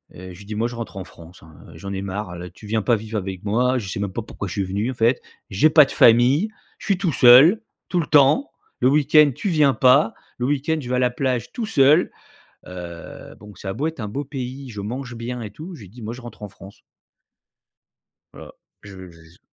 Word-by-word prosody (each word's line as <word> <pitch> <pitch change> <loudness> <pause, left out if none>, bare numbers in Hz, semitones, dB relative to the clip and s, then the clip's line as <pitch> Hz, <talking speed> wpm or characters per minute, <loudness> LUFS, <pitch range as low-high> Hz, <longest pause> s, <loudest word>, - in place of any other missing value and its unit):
Heu, 90 +1 -10
je - - -13
lui 100 - -14
ai - - -17
dit: 105 - -6
«Moi, 115 +3 0
je 120 - -8
rentre 115 -3 -7
en 95 - -5
France. 85 -1 -16
Hein, 80 0 -16 0.2
heu, - - -14
j'en 100 +3 -7
ai 95 - -4
marre. 100 -1 -5
Là, 90 +1 -8
tu 95 - -16
viens 110 0 0
pas 120 +2 +2
vivre 110 +1 -5
avec 95 -2 -6
moi. 125 +5 +1
Je 105 - -5
sais - - -5
même 100 -1 -3
pas 115 - -3
pourquoi 105 - -7
je 85 - -6
suis 100 - -1
venu, 100 +7 -2
en - - -6
fait. 120 +2 +1 0.3
J'ai 105 +12 +3
pas 150 -2 +7
de - - -8
famille. 125 - +4 0.3
Je - - -11
suis 195 - +2
tout 180 -6 -1
seul, 135 - +7 0.3
tout 180 - 0
le 155 - -2
temps. 150 - +4 0.3
Le 125 - +3
weekend, 150 0 +4
tu 200 - -3
viens 150 -5 +3
pas. 125 -3 +4 0.2
Le 125 - -2
weekend, 145 +2 -1
je 125 - -8
vais 125 - 0
à - - +1
la 125 -1 +2
plage 125 -1 -2
tout 235 - -3
seul». 150 -4 +3 0.6
Heu, 85 -2 -10
donc 105 -3 -13
ça 95 - -6
a - - -2
beau 145 +10 -3
être 160 -4 -5
un 105 - -4
beau 135 +8 -4
pays, 130 0 -7
je 105 -4 -7
mange 120 +4 -6
bien 120 +1 -5
et 110 -3 -7
tout, 165 - -10
je - - -12
lui 105 - -11
ai - - -15
dit: 115 +4 -14
«Moi, 110 - -5
je 130 - -11
rentre 120 -3 -12
en 105 - -6
France». 95 +1 -15 1.5
Voilà. - - -12 0.3
Je 95 -3 -11
j'ai 85 -1 -18
je 80 +1 -21
120 Hz, 260 wpm, -21 LUFS, 100-140 Hz, 1.5 s, pas